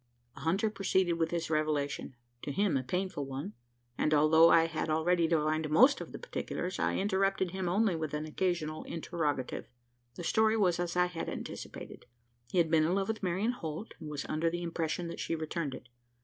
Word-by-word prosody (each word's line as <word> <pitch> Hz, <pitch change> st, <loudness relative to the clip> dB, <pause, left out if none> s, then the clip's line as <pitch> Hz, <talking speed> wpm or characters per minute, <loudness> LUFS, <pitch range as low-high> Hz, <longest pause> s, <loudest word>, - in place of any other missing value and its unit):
The -, -, -12 dB
hunter 195 Hz, +7 st, +1 dB
proceeded 190 Hz, -4 st, +1 dB
with 165 Hz, 0 st, +1 dB
his 170 Hz, -1 st, -2 dB
revelation 150 Hz, -4 st, -1 dB, 0.3 s
to 145 Hz, -, -4 dB
him, 200 Hz, +3 st, +1 dB
a 135 Hz, -, +2 dB
painful 180 Hz, +3 st, -2 dB
one 135 Hz, -5 st, -5 dB, 0.5 s
and, 155 Hz, -, +3 dB
although 160 Hz, +2 st, +6 dB
I 165 Hz, -1 st, +6 dB
had 165 Hz, -1 st, -3 dB
already 165 Hz, +2 st, +2 dB
divined 155 Hz, -1 st, +1 dB
most 255 Hz, -, +5 dB
of -, -, -7 dB
the -, -, -6 dB
particulars, 185 Hz, -, -4 dB
I -, -, +1 dB
interrupted 195 Hz, -2 st, +1 dB
him 190 Hz, -1 st, -2 dB
only 200 Hz, 0 st, +2 dB
with 155 Hz, -2 st, -3 dB
an 150 Hz, +1 st, -3 dB
occasional 155 Hz, -1 st, -1 dB
interrogative. 155 Hz, -5 st, -3 dB, 0.5 s
The -, -, -6 dB
story 220 Hz, +5 st, +3 dB
was 180 Hz, -5 st, +2 dB
as 175 Hz, 0 st, -2 dB
I 180 Hz, 0 st, +4 dB
had 180 Hz, -2 st, -4 dB
anticipated. -, -, -7 dB, 0.4 s
He -, -, -3 dB
had 165 Hz, -2 st, +3 dB
been 160 Hz, -1 st, +5 dB
in 170 Hz, +4 st, +2 dB
love 195 Hz, +1 st, 0 dB
with 220 Hz, -1 st, -2 dB
Marian 190 Hz, +5 st, 0 dB
Holt; 170 Hz, -2 st, -6 dB
and 155 Hz, -, -7 dB
was 145 Hz, -1 st, -4 dB
under 160 Hz, +2 st, 0 dB
the 175 Hz, +1 st, -4 dB
impression 170 Hz, 0 st, -2 dB
that -, -, -7 dB
she -, -, -1 dB
returned 155 Hz, -3 st, -3 dB
it. -, -, -12 dB
170 Hz, 195 wpm, -31 LUFS, 155-185 Hz, 0.5 s, although